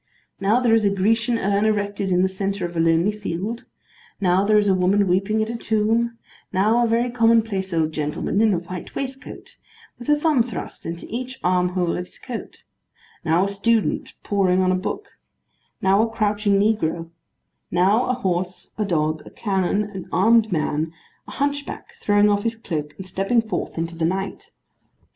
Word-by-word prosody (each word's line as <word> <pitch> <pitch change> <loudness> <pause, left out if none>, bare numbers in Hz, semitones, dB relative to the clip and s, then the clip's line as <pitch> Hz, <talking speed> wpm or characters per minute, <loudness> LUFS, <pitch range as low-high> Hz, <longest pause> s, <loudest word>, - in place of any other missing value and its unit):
Now, 205 +5 +3
there 240 -3 +3
is 225 -1 +4
a 200 - +4
Grecian 225 +5 +1
urn 200 0 +1
erected 205 -2 0
in 180 0 +3
the - - +4
centre 195 0 -2
of 175 0 -6
a - - -1
lonely 165 +4 +3
field; 210 +2 -4 0.5
now 185 0 +3
there 210 +1 +4
is 205 -1 +3
a 195 - +4
woman 190 +2 +2
weeping 195 +4 +1
at 220 - -4
a - - -4
tomb; 230 +1 0 0.3
now 215 +6 +3
a - - +2
very 235 +2 +1
commonplace 225 -5 +2
old 160 -2 +1
gentleman 155 +6 -1
in 220 -1 +4
a 185 - +2
white 175 +1 -7
waistcoat, 270 0 -7 0.4
with 240 - -7
a 295 0 +4
thumb 300 -5 +3
thrust 230 -4 -5
into 170 +1 -5
each 255 +3 -5
arm 180 0 +2
hole 180 -2 0
of 180 - -3
his - - -14
coat; 245 -3 -8 0.6
now 165 +3 +3
a - - +1
student 210 +2 0
poring 190 -3 +2
on 185 - +3
a - - +2
book; 195 - -3 0.8
now 195 +2 +4
a 225 - +1
crouching 210 -2 +1
negro; 170 -6 0 0.6
now, 195 +7 +3
a 255 - 0
horse, 185 -4 -3
a 210 - +1
dog, 155 -4 0
a - - -8
cannon, 195 -1 0
an 200 -3 -8
armed 225 -1 +4
man; 155 -1 -1 0.4
a - - -9
hunch 285 0 0
back - - -9
throwing 205 0 +3
off 205 -1 +2
his 230 +1 -1
cloak 155 -9 -5
and 190 - -7
stepping 195 +5 +1
forth 220 -5 -3
into 165 +1 -3
the 165 -1 -1
light. 190 +3 -3
200 Hz, 185 wpm, -22 LUFS, 180-225 Hz, 0.8 s, is